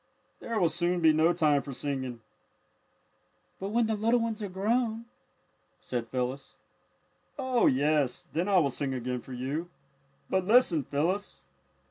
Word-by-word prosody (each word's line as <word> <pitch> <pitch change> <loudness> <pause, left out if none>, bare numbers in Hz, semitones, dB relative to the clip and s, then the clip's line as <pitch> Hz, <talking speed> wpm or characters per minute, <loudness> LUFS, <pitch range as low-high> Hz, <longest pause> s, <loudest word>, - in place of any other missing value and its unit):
There 230 -2 -2
will 175 - +4
soon 175 +2 0
be 160 -2 +5
no 160 +2 +4
time 150 -4 +2
for 140 - -8
singing." 130 -3 -4 1.4
"But 195 - -4
when 235 +2 +2
the 220 - 0
little 225 +3 +2
ones 230 -1 -2
are 205 - -3
grown 225 +4 0 0.4
" - - -42 0.3
said 120 -2 -4
Phyllis. 130 +3 -4 0.8
"Oh, 260 -3 +2
yes, 145 0 +1
then 175 +5 0
I 195 - +4
will 145 -6 +3
sing 135 0 -2
again 125 0 -3
for 130 - -10
you. 140 +7 -3 0.6
But 190 -1 0
listen, 205 - +4
Phyllis!" 175 +8 -2
170 Hz, 150 wpm, -29 LUFS, 135-210 Hz, 1.4 s, be